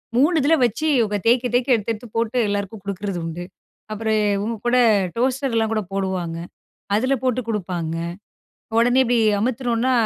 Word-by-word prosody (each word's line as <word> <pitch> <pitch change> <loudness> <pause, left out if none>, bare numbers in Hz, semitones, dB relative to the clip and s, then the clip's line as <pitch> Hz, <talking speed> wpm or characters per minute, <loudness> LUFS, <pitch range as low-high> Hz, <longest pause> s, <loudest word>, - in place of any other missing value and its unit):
3 295 +8 +4
இதில 315 +4 +4
வச்சு, 240 +7 -2
இவுங்க 210 -2 +1
தேய்க்க 245 +1 +3
தேய்க்க, 250 +1 +3
எடுத்து 225 0 -2
எடுத்து 230 +3 -10
போட்டு 230 +2 0
எல்லாருக்கும் 205 0 -3
குடுக்குறது 200 -2 -4
உண்டு. 165 +2 -5 0.5
அப்புறம் 220 0 0 0.2
இவுங்க 220 +3 -2
கூட, 250 - +3 0.4
டோஸ்டர்லாம் 245 -2 0
கூட 215 - 0
போடுவாங்க. 185 -4 -2 0.6
அதில 255 +6 +2
போட்டு 255 -1 +1
குடுப்பாங்க. 180 -7 -3 0.8
உடனே 245 +3 +4
இப்படி 245 -1 +1 0.2
அமுத்துனோம்னா, 245 +1 0
230 Hz, 145 wpm, -22 LUFS, 200-250 Hz, 0.8 s, 3